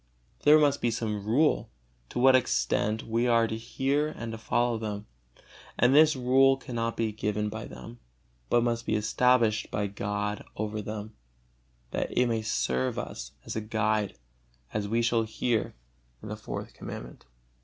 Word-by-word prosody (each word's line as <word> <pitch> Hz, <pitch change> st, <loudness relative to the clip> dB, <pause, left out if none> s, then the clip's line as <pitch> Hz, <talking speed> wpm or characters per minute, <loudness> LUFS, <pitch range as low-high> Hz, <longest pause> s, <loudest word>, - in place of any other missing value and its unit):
There 150 Hz, +1 st, +7 dB
must 145 Hz, -2 st, +3 dB
be 120 Hz, -, +2 dB
some 105 Hz, -3 st, -3 dB
rule, 145 Hz, +8 st, +2 dB, 0.4 s
to -, -, -7 dB
what 130 Hz, +1 st, +6 dB
extent 105 Hz, -, +1 dB
we 115 Hz, +2 st, +1 dB
are 115 Hz, -1 st, +4 dB
to 110 Hz, -, -3 dB
hear 135 Hz, +6 st, 0 dB
and 115 Hz, -7 st, -6 dB
to 110 Hz, -, -5 dB
follow 120 Hz, +1 st, +1 dB
them, 105 Hz, -1 st, -4 dB, 0.7 s
and 125 Hz, +2 st, +4 dB
this 155 Hz, +1 st, +6 dB
rule 135 Hz, +1 st, +4 dB
cannot 115 Hz, -3 st, -3 dB
be 115 Hz, -1 st, 0 dB
given 105 Hz, 0 st, -2 dB
by 110 Hz, +1 st, -6 dB
them, 120 Hz, +1 st, -10 dB, 0.5 s
but 120 Hz, -, +4 dB
must 120 Hz, -1 st, -1 dB
be -, -, +1 dB
established 110 Hz, 0 st, +2 dB
by 105 Hz, -1 st, -1 dB
God 105 Hz, +1 st, -3 dB
over 110 Hz, 0 st, -3 dB
them, 105 Hz, +1 st, -6 dB, 0.8 s
that -, -, -2 dB
it 125 Hz, -, +5 dB
may 115 Hz, -2 st, 0 dB
serve 65 Hz, -11 st, -1 dB
us -, -, -6 dB
as -, -, -5 dB
a 110 Hz, -, -1 dB
guide, 110 Hz, -5 st, 0 dB, 0.6 s
as 105 Hz, -1 st, -1 dB
we 115 Hz, +2 st, +1 dB
shall 115 Hz, 0 st, +2 dB
hear 110 Hz, -, -1 dB, 0.5 s
in -, -, -7 dB
the -, -, -3 dB
Fourth -, -, -6 dB
Commandment. -, -, -9 dB
115 Hz, 165 wpm, -28 LUFS, 105-120 Hz, 0.8 s, There